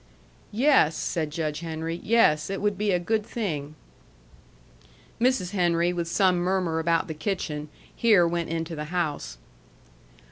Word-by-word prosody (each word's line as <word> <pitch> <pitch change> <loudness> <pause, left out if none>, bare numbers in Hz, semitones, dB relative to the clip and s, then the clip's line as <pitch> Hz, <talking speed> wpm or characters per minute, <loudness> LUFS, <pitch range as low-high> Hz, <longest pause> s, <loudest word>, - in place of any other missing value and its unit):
"Yes," 235 - +4
said 160 -3 -2
Judge 155 -1 -3
Henry, 165 +1 -4
"yes. 190 -9 +3
It 195 - -3
would 205 0 0
be 210 +2 -1
a 180 - +3
good 215 +5 -1
thing." 155 -11 -4 1.4
Mrs. 235 -7 +1
Henry, 175 -2 +1
with 170 -1 -2
some 185 +1 +3
murmur 175 -2 0
about 165 +2 +1
the 160 - -4
kitchen, 155 -3 -3 0.3
here 205 -7 +4
went 170 0 -2
into 165 0 -3
the 150 0 -5
house. 155 - -3
170 Hz, 140 wpm, -26 LUFS, 160-195 Hz, 1.4 s, Yes